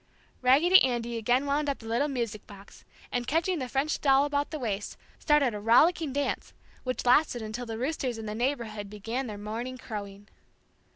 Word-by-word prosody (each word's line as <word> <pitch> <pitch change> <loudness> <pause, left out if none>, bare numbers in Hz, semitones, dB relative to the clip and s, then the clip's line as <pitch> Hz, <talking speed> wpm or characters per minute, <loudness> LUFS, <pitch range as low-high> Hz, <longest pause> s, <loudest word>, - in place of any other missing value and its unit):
Raggedy 300 +9 +6
Andy 240 -2 0
again 245 +4 +1
wound 285 +1 0
up 275 - -1
the 225 - -14
little 235 +6 0
music 235 -7 -4
box 200 -1 -14 0.3
and, 245 -1 -2
catching 335 +3 +1
the 255 -2 -4
French 280 +4 -1
doll 275 0 +4
about 290 0 -1
the 310 - -4
waist, 210 -6 -4 0.2
started 295 -6 +3
a 210 - -4
rollicking 300 - +4
dance 285 +1 -2 0.3
which 255 -1 -3
lasted 245 -2 +3
until 225 +3 -5
the 225 -1 -4
roosters 255 -2 -2
in 225 - -6
the 210 - -4
neighborhood 225 -4 -2
began 225 +6 -4
their 210 -2 -6
morning 230 +5 -5
crowing. 205 -4 -8
245 Hz, 180 wpm, -28 LUFS, 220-285 Hz, 0.3 s, Raggedy